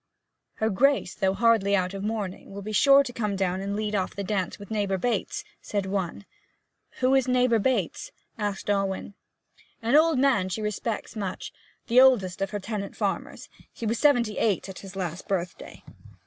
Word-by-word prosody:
'Her 220 0 0
Grace, 270 -2 +2
though 190 0 0
hardly 225 -3 +3
out 185 -1 0
of 195 0 -5
mourning, 210 -3 -4
will 200 0 -8
be 215 - -5
sure 275 +6 +6
to 250 -3 -7
come 210 -4 -2
down 190 -1 -1
and 200 +1 -3
lead 210 0 -2
off 190 -3 -1
the 200 - -3
dance 190 -2 -2
with 200 +1 -12
neighbour 200 -3 0
Bates,' 220 +1 -1 0.2
said 205 -2 -2
one. 190 0 -3 0.8
'Who 255 +1 +4
is 265 -1 +3
neighbour 250 -2 +3
Bates?' 265 - -1 0.2
asked 205 -3 -3
Alwyn. 195 -1 -1 0.7
'An 235 +3 +1
old 315 -1 +5
man 255 -9 +3
she 190 - -3
respects 210 +2 -3
much 195 -4 -5 0.3
the 250 +2 +6
oldest 200 -9 +4
of 195 - 0
her 205 - -3
tenant 205 0 -5
farmers. - - -3 0.2
He 230 - -7
was 225 +2 0
seventy 245 -8 +3
eight 210 -5 +1
his 195 0 -9
last 180 -2 -4
birthday.' 180 -2 -4
205 Hz, 175 wpm, -26 LUFS, 195-235 Hz, 0.8 s, sure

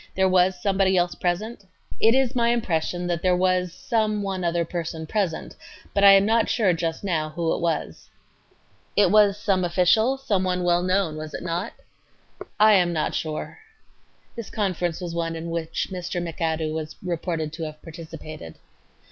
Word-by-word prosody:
There 190 0 +3
was 185 0 +3
somebody 190 0 +2
else 175 0 +1
present? 205 +7 -2
A. 190 +3 -4
It 225 - +5
is 265 -1 +1
my 235 -1 +2
impression 180 -6 -1
that 175 -1 -1
there 180 -1 +2
was 185 -1 +1
some 215 +1 -1
one 190 -2 -3
other 170 0 0
person 165 -1 -5
present, 185 -1 -2 0.4
but 200 - +1
I 200 0 +10
am 195 0 +5
not 225 +1 +2
sure 205 -7 +2
just 165 +1 -3
now 160 -5 -1
who 165 +1 -1
it - - -3
was. 165 -3 -3 0.9
Q. 205 - +5
It - - +1
was 205 -1 +5
some 195 -3 0
official, 185 +9 +3
some 210 -9 0
one 180 -1 -1
well 175 0 +3
known, 185 -3 0
was 155 0 -6
it - - -6
not....? 175 +5 -3 0.7
A. - - -7
I 215 0 +7
am 180 -3 +4
not 160 -2 -1
sure.... 155 - -4 0.8
[This 230 -3 -7
conference 180 -5 -2
was 175 -2 -5
one 165 -1 -2
in 165 +1 -5
which 165 -1 -3
Mr. 180 -1 -4
McAdoo 160 -2 -2
was 155 -1 -5
reported 165 -3 -3
to 165 0 -5
have 155 0 -8
participated. 155 - -9
180 Hz, 180 wpm, -24 LUFS, 165-200 Hz, 0.9 s, I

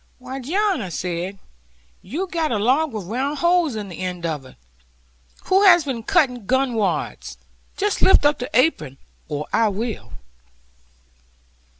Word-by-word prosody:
'Why, 255 +1 -7
John,' 345 - 0
said 180 +2 -4
I, - - -27 0.6
'you'm 345 - -4
got 325 -4 -1
a 225 - +1
log 265 +9 +2
with 215 -4 -5
round 265 +9 -2
holes 340 -4 +2
in 210 -2 -5
the 180 - -9
end 180 -2 -4
of 150 -5 -3
it. - - -17 0.9
Who 380 +1 +3
has 350 -4 +7
been 260 -5 -3
cutting 245 -3 +1
gun 260 -1 +1
wads? 215 -3 -2 0.4
Just 410 0 -1
lift 380 - +6
your 290 -4 +1
apron, 165 - +2 0.3
or 150 0 -3
I 225 - +4
will.' 215 +2 -5
250 Hz, 150 wpm, -22 LUFS, 195-310 Hz, 0.9 s, has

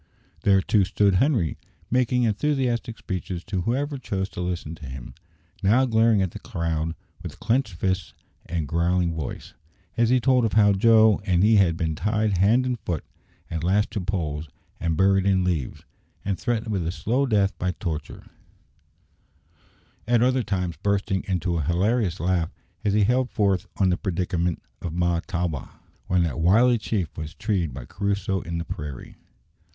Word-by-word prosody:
There, 95 -2 +4
too, 105 0 +3
stood 100 0 +2
Henri, 125 - +1 0.3
making 125 0 +2
enthusiastic 120 0 0
speeches 90 -2 -5
to 95 -1 -2
whoever 140 - -1
chose 95 -5 -3
to 90 - -6
listen 90 -3 -3
to 75 -4 -10
him 65 -1 -8 0.5
now 115 +7 +4
glaring 110 -3 +3
at 95 - -2
the - - -8
crowd 80 -1 -2 0.3
with 85 -5 -8
clenched 115 -3 0
fists 95 +1 -2 0.3
and 80 -3 -2
growling 85 +2 +1
voice, 80 -5 -6 0.4
as 115 -1 +3
he 130 +1 +4
told 125 0 +3
of 110 - 0
how 105 -2 +5
Joe 110 +1 +5
and 90 -2 +2
he 110 +1 +5
had 85 -5 +3
been 80 -2 -1
tied 105 +3 0
hand 115 +7 +4
and 125 -2 -1
foot, 85 -6 -3 0.4
and 80 -1 -4
lashed 100 +4 +2
to 105 -3 -2
poles, 80 -5 -3 0.3
and 80 -2 -1
buried 95 +1 +3
in 95 -2 +3
leaves, 85 -8 -2 0.4
and 95 -4 -1
threatened 110 +4 -1
with 95 -5 -1
a - - 0
slow 120 +10 0
death 100 -4 +2
by 90 - 0
torture; 80 -5 -5 1.8
at 120 -1 +4
other 130 +1 +3
times 90 - -2
bursting 100 +1 0
into 90 -2 0
a - - +1
hilarious 95 - +1
laugh 85 -2 +1 0.3
as 100 - +1
he 105 0 +4
held 125 +4 +2
forth 100 -4 +1
on 95 -2 +3
the 90 - +1
predicament 90 -3 -1 0.2
of 85 -3 -4
Mahtawa, 85 -3 -2 0.3
when 90 -1 +2
that 80 -6 -2
wily 115 +8 +4
chief 100 -5 -2
was 75 -1 -6
treed 95 -9 -1
by 65 -1 -8
Crusoe 100 - -1
in 85 0 -4
the 85 - -4
prairie. 75 -5 -7
95 Hz, 165 wpm, -25 LUFS, 85-110 Hz, 1.8 s, how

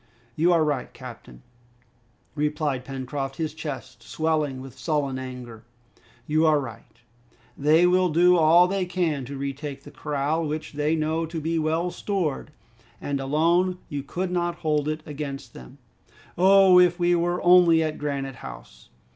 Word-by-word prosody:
"You 170 +3 +3
are 165 -2 +4
right, 145 -4 -2
captain," 60 0 -12 0.9
replied 150 -3 -1
Pencroft, 135 +1 -5
his 155 -1 -3
chest 140 -6 -7
swelling 155 0 -1
with 130 -1 -10
sullen 145 -5 -2
anger. 125 -3 -8 0.6
"You 155 +3 +1
are 155 -1 +4
right; 120 -2 -10 0.5
they 155 +4 +4
will 180 0 +3
do 175 +3 +4
all 170 +2 +6
they 195 0 -1
can 170 -7 -1
to 140 +2 -7
retake 140 0 -5
the 145 - -12
corral, 150 +2 -2
which 150 +1 -5
they 150 +2 0
know 160 +1 -1
to 165 0 -5
be 165 +1 -1
well 160 +3 0
stored; 180 -11 -3 0.5
and 140 -1 -3
alone 170 +7 +1
you 145 -3 -3
could 180 +6 -4
not 175 -1 -1
hold 150 -1 +1
it 155 0 -3
against 145 -2 -6
them." 60 -1 -13 0.6
"Oh, 190 0 +6
if 175 -1 +4
we 175 0 +3
were 175 +1 0
only 175 -2 +6
at 155 -1 -3
Granite 140 -3 -4
House!" - - -11
155 Hz, 155 wpm, -25 LUFS, 140-175 Hz, 0.9 s, all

